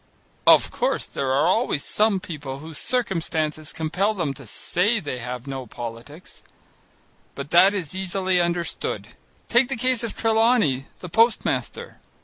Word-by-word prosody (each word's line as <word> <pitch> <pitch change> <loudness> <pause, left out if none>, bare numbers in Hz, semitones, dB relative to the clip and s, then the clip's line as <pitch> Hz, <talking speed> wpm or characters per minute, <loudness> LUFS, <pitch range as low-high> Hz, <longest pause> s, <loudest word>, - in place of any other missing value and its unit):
Of - - +6
course - - -1
there 135 -1 -3
are 140 +3 +3
always 185 - +1
some 210 -2 +2
people 145 -7 -7
whose 155 +1 -7
circumstances 160 - -1
compel 180 +7 -1
them 165 -7 -1
to 135 -2 -12
say 185 - 0
that - - -12
they 130 -3 -3
have 125 +1 -6
no 135 -2 -6
politics. 120 +9 -9 0.9
But 140 +1 -7
that 190 +4 +6
is 180 -6 -4
easily 185 -1 0
understood. 170 0 -2 0.4
Take 245 +2 +3
the 270 - -1
case 255 0 +1
of 230 - -4
Trelawney, 220 - +2
the 180 - -7
postmaster. 225 +5 0
170 Hz, 145 wpm, -23 LUFS, 140-210 Hz, 0.9 s, Of